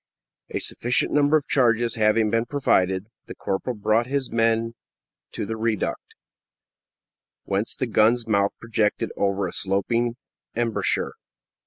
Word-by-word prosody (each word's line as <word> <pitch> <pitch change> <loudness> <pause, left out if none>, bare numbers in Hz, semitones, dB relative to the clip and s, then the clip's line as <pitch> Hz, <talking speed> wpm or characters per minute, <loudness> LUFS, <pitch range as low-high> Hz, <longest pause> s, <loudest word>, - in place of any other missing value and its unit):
A - - -3
sufficient 120 +1 -1
number 145 +1 +4
of 145 - -4
charges 120 -3 +2
having 110 0 +2
been 115 +1 +1
provided, 95 -8 +1 0.2
the - - -8
corporal 110 +6 -3
brought 110 +3 +1
his 135 -1 -2
men 115 0 +1 0.6
to - - -3
the 110 - -3
reduct, 110 -2 -2 1.3
whence 100 +3 -1
the 130 - -1
gun's 115 +1 +3
mouth 100 -2 +1
projected 110 -3 0
over 100 -1 0
a 90 - -7
sloping 115 +5 0 0.4
embrasure. 115 -1 0
115 Hz, 130 wpm, -24 LUFS, 105-120 Hz, 1.3 s, number